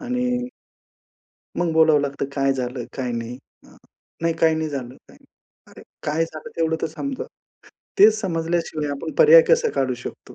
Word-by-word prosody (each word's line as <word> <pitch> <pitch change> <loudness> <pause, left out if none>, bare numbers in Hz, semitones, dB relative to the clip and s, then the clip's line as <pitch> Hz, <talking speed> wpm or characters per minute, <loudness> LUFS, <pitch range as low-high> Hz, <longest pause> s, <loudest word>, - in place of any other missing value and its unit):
आणि 250 0 -2 1.1
मग 175 -2 0
बोलावं 160 -2 +5
लागतं, 140 0 -3
"काय 135 -1 +2
झालं? 125 -2 -4
काय 125 -2 -3
नाही?" 115 +1 -5 0.3
अ, - - -19 0.5
"नाही, 165 -1 +1
काही 160 -1 +3
नाही 160 0 -2
झालं. 130 -3 -6
काही - - -17
नाही." - - -29
"अरे - - -13 0.2
काय 155 +2 0
झालं 155 -1 -10
तेवढं 160 -1 +1
तर - - +1
समजव." 265 - -5 0.7
तेच 210 +2 +8
समजल्याशिवाय 165 -4 -2
आपण 145 +3 -5
पर्याय 485 +2 +9
कसा 480 -1 +4
काढू 130 -2 0
शकतो? - - -9
160 Hz, 160 wpm, -22 LUFS, 140-190 Hz, 1.1 s, पर्याय